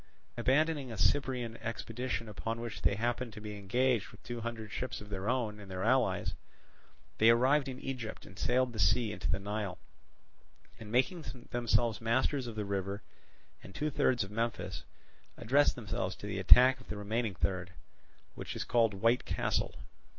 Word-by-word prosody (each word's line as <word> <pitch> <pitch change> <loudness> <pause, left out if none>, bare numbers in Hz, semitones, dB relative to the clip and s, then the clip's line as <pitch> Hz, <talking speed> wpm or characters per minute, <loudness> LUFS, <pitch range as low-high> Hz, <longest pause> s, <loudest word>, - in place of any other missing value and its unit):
Abandoning 140 +2 +1
a 110 - -6
Cyprian 125 - +1
expedition 115 +1 -4
upon 110 +2 -4
which 115 -1 -6
they 100 - +3
happened 120 +1 -1
to 105 - -8
be 105 0 -6
engaged 120 +3 +1
with - - -17
two 120 0 -5
hundred 115 -2 -5
ships 130 - -4
of 105 - -11
their 100 +1 -3
own 115 -5 -1
and 100 -2 -11
their 95 0 -4
allies, 125 +1 +2 0.9
they 110 - +7
arrived 135 +5 +4
in 130 -1 -5
Egypt 120 -5 -5
and 95 - -13
sailed 125 +1 +2
from - - -10
the 110 - -6
sea 105 +5 +3
into 90 -4 -4
the 95 - +2
Nile, 100 -2 -3 1.0
and 105 -1 -9
making 145 - +2 0.3
themselves 120 -2 +1
masters 130 +3 +1
of 115 - -6
the 105 -1 -2
river 100 +1 -3 0.6
and 95 - -12
two 150 +1 -1
thirds 125 -4 +2
of 95 - -8
Memphis, 115 +2 -2 0.6
addressed 140 +6 +3
themselves 100 -5 -3
to - - -10
the 100 -1 -3
attack 125 +7 +8
of - - -17
the 105 - -4
remaining 105 0 -1
third, 90 0 -1 0.6
which - - -6
is - - -2
called 115 -4 +2
White 115 +5 +3
Castle. 90 - -1
115 Hz, 175 wpm, -32 LUFS, 105-125 Hz, 1.0 s, attack